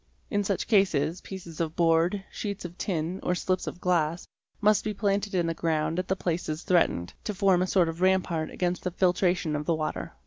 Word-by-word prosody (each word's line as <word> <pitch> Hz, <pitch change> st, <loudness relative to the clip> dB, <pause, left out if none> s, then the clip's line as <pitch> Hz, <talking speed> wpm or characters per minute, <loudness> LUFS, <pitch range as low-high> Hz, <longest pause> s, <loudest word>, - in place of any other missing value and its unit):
In 205 Hz, -1 st, +1 dB
such 195 Hz, -1 st, -1 dB
cases, 180 Hz, -6 st, +2 dB
pieces 170 Hz, -4 st, -7 dB
of 160 Hz, -1 st, -2 dB
board, 170 Hz, +3 st, +2 dB
sheets 200 Hz, -3 st, -5 dB
of 175 Hz, 0 st, -7 dB
tin, 175 Hz, -1 st, -2 dB
or 180 Hz, -, 0 dB
slips 185 Hz, +1 st, -1 dB
of 175 Hz, -, -5 dB
glass, 170 Hz, -2 st, 0 dB, 0.3 s
must 210 Hz, -1 st, +3 dB
be 210 Hz, -1 st, -3 dB
planted 200 Hz, -1 st, 0 dB
in 175 Hz, -2 st, +2 dB
the 165 Hz, -, 0 dB
ground 165 Hz, +1 st, 0 dB
at 185 Hz, -, -3 dB
the 190 Hz, -, +1 dB
places 165 Hz, -3 st, -2 dB
threatened, 165 Hz, -, +2 dB
to 210 Hz, -, -3 dB
form 190 Hz, -2 st, +3 dB
a 185 Hz, -, +1 dB
sort 180 Hz, -2 st, +3 dB
of 165 Hz, +2 st, -5 dB
rampart 185 Hz, -4 st, +2 dB
against 180 Hz, -1 st, -1 dB
the 180 Hz, -, 0 dB
filtration 180 Hz, -3 st, +1 dB
of 150 Hz, 0 st, -4 dB
the 165 Hz, -, +3 dB
water. 155 Hz, -, -3 dB
180 Hz, 205 wpm, -27 LUFS, 165-190 Hz, 0.3 s, must